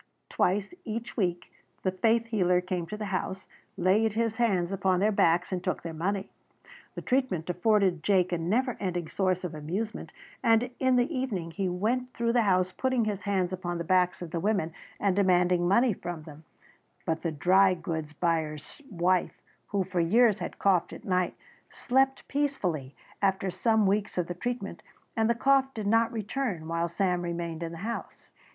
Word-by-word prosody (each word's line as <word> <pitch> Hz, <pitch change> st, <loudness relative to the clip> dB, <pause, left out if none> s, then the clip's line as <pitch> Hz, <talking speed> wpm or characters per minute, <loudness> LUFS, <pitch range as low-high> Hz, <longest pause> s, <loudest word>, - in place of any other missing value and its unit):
Twice 200 Hz, -, 0 dB
each 230 Hz, +1 st, -5 dB
week 175 Hz, -5 st, -2 dB, 0.3 s
the 185 Hz, -, +1 dB
faith 225 Hz, +4 st, +2 dB
healer 185 Hz, -6 st, +2 dB
came 180 Hz, -2 st, -3 dB
to 210 Hz, -, -6 dB
the 210 Hz, -, -4 dB
house, 190 Hz, 0 st, -3 dB, 0.3 s
laid 200 Hz, +4 st, +3 dB
his 225 Hz, 0 st, 0 dB
hands 195 Hz, -7 st, +1 dB
upon 190 Hz, -2 st, +1 dB
their 210 Hz, +3 st, +3 dB
backs 175 Hz, -2 st, +2 dB
and 180 Hz, -1 st, -2 dB
took 185 Hz, -, -2 dB
their 165 Hz, -1 st, -5 dB
money. 190 Hz, +5 st, -2 dB, 0.6 s
The -, -, -6 dB
treatment 220 Hz, -11 st, 0 dB
afforded 185 Hz, -2 st, +2 dB
Jake 185 Hz, -1 st, +2 dB
a 175 Hz, -, 0 dB
never 235 Hz, +9 st, 0 dB
ending 175 Hz, -4 st, -2 dB
source 185 Hz, -2 st, 0 dB
of 175 Hz, -3 st, -4 dB
amusement 185 Hz, +9 st, -4 dB, 0.3 s
and 230 Hz, +2 st, +3 dB
in 260 Hz, -1 st, +3 dB
the 250 Hz, +6 st, +1 dB
evening 205 Hz, -11 st, -2 dB
he 185 Hz, +3 st, -1 dB
went 240 Hz, +8 st, -1 dB
through 235 Hz, 0 st, 0 dB
the 240 Hz, -, +4 dB
house 185 Hz, -3 st, +2 dB
putting 260 Hz, +1 st, 0 dB
his 205 Hz, -2 st, -2 dB
hands 190 Hz, -2 st, 0 dB
upon 175 Hz, -1 st, -3 dB
the 170 Hz, -, -3 dB
backs 180 Hz, +1 st, +2 dB
of 165 Hz, -, -8 dB
the 170 Hz, -, -2 dB
women 195 Hz, -4 st, 0 dB, 0.3 s
and 200 Hz, -2 st, +1 dB
demanding 180 Hz, -2 st, +3 dB
money 235 Hz, +5 st, +4 dB
from 175 Hz, -3 st, -6 dB
them, 155 Hz, 0 st, -13 dB, 0.6 s
but 160 Hz, 0 st, -1 dB
the 165 Hz, -, -1 dB
dry 185 Hz, +5 st, +4 dB
goods 160 Hz, -3 st, -4 dB
buyer's 155 Hz, -, -2 dB
wife, 180 Hz, -2 st, +1 dB, 0.3 s
who 200 Hz, -2 st, 0 dB
for 185 Hz, -1 st, -3 dB
years 215 Hz, +5 st, +4 dB
had -, -, -5 dB
coughed 185 Hz, -4 st, +2 dB
at -, -, -10 dB
night, 180 Hz, -2 st, 0 dB, 0.3 s
slept 270 Hz, +1 st, +1 dB
peacefully 180 Hz, -, -1 dB, 0.3 s
after 190 Hz, -1 st, +1 dB
some 220 Hz, +3 st, +2 dB
weeks 200 Hz, +1 st, 0 dB
of 180 Hz, -, +1 dB
the 175 Hz, -, -4 dB
treatment 245 Hz, +7 st, -4 dB, 0.3 s
and 225 Hz, -1 st, +2 dB
the 235 Hz, -, +3 dB
cough 270 Hz, +2 st, +3 dB
did 215 Hz, -2 st, -4 dB
not 225 Hz, +2 st, +3 dB
return 215 Hz, -6 st, -3 dB
while 165 Hz, +1 st, 0 dB
Sam 180 Hz, 0 st, 0 dB
remained 170 Hz, -1 st, -4 dB
in 165 Hz, -1 st, -3 dB
the 165 Hz, -, -8 dB
house. 230 Hz, 0 st, -6 dB
190 Hz, 180 wpm, -28 LUFS, 175-225 Hz, 0.6 s, the